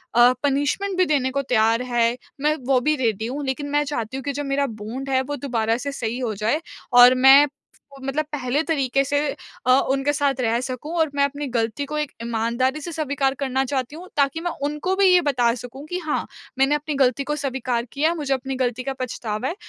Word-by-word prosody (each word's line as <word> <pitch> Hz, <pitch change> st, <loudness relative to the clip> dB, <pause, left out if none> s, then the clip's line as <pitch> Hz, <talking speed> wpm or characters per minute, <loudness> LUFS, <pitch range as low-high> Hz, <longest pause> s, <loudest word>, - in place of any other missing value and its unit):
अ, 240 Hz, +1 st, +7 dB
punishment 290 Hz, +8 st, 0 dB
भी 370 Hz, -, +4 dB
देने 275 Hz, -5 st, +1 dB
को 280 Hz, -, 0 dB
तैयार 225 Hz, 0 st, +3 dB
है, 240 Hz, -1 st, +1 dB, 0.2 s
मैं 300 Hz, +1 st, +2 dB
वो 270 Hz, -2 st, +4 dB
भी 305 Hz, -, +4 dB
रेडी 220 Hz, 0 st, 0 dB
हूँ। 285 Hz, +4 st, -4 dB
लेकिन 280 Hz, +2 st, -3 dB
मैं 290 Hz, +1 st, +2 dB
चाहती 260 Hz, -4 st, -4 dB
हूँ 270 Hz, -, -6 dB
कि 285 Hz, -, -2 dB
जो 290 Hz, +2 st, -3 dB
मेरा 280 Hz, 0 st, 0 dB, 0.2 s
बॉन्ड 260 Hz, +6 st, -5 dB
है, 260 Hz, -1 st, +2 dB
वो 290 Hz, +2 st, -4 dB
दोबारा 230 Hz, -5 st, -1 dB
से 280 Hz, +3 st, -4 dB
सही 240 Hz, -3 st, -3 dB
हो 240 Hz, -4 st, -2 dB
जाए 220 Hz, +10 st, 0 dB, 0.3 s
और 245 Hz, +1 st, +8 dB
मैं 275 Hz, +2 st, +9 dB, 0.4 s
उसको 275 Hz, -1 st, -12 dB
मतलब 285 Hz, +3 st, -1 dB
पहले 270 Hz, 0 st, 0 dB
तरीके 275 Hz, -4 st, +1 dB
से 285 Hz, +2 st, 0 dB, 0.5 s
अ, 255 Hz, -, +4 dB, 0.2 s
उनके 275 Hz, +2 st, +1 dB
साथ 280 Hz, -3 st, 0 dB
रह 230 Hz, -1 st, +1 dB
सकूँ 260 Hz, +5 st, -5 dB
और 320 Hz, -1 st, +3 dB
मैं 280 Hz, -, +3 dB
अपनी 285 Hz, +1 st, -4 dB
गलती 230 Hz, +2 st, -1 dB
को 300 Hz, +2 st, -4 dB
एक 300 Hz, -2 st, -2 dB
ईमानदारी 235 Hz, +5 st, -1 dB
से 340 Hz, -, -6 dB
स्वीकार 285 Hz, -4 st, 0 dB
करना 265 Hz, -1 st, 0 dB
चाहती 265 Hz, +1 st, -3 dB
हूँ 355 Hz, +3 st, -10 dB
ताकि 280 Hz, +3 st, +1 dB
मैं 350 Hz, 0 st, -2 dB
उनको 300 Hz, +6 st, -1 dB
भी 395 Hz, 0 st, +3 dB
ये 360 Hz, -1 st, +6 dB
बता 250 Hz, -6 st, +2 dB
सकूँ 250 Hz, +4 st, -9 dB
कि 360 Hz, -, -2 dB
हाँ, 315 Hz, -4 st, -2 dB, 0.3 s
मैंने 270 Hz, +2 st, +4 dB
अपनी 295 Hz, 0 st, -3 dB
गलती 270 Hz, 0 st, +2 dB
को 295 Hz, +2 st, -2 dB
स्वीकार 260 Hz, -4 st, -2 dB
किया 295 Hz, +3 st, +1 dB
है। 340 Hz, -, -1 dB
मुझे 290 Hz, -4 st, -1 dB
अपनी 265 Hz, 0 st, -3 dB
गलती 255 Hz, -1 st, -1 dB
का 270 Hz, +1 st, -3 dB
पछतावा 230 Hz, -2 st, -3 dB
है 340 Hz, -, -4 dB
270 Hz, 225 wpm, -23 LUFS, 250-290 Hz, 0.5 s, मैं